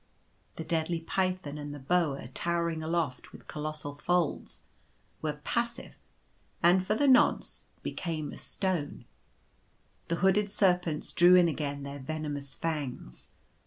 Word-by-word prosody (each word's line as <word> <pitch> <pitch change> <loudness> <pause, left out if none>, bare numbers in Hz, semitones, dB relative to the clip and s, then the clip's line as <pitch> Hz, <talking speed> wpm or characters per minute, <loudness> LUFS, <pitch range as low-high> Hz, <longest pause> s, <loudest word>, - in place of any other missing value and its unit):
The 160 - -5
deadly 165 +1 0
python 185 -4 -1
and 145 0 -6
the - - -8
boa 145 -3 +1
towering 170 +2 -1
aloft, 160 -5 -2
with - - -14
colossal 150 -1 -4
folds, 170 +2 -1 0.6
were 150 -1 -3
passive, 235 +1 -2 0.7
and 180 +2 +6
for 210 +3 +1
the 285 +5 +2
nonce, 260 -2 +4 0.2
became 155 -4 -3
as - - -9
stone. 185 -7 -2 1.0
The 170 - 0
hooded 190 +3 +3
serpents 180 -6 +2
drew 175 +1 +7
in 180 -1 +7
again 145 -3 -2
their 140 0 -6
venomous 145 -1 -4
fangs. 145 - -4
160 Hz, 125 wpm, -30 LUFS, 145-180 Hz, 1.0 s, drew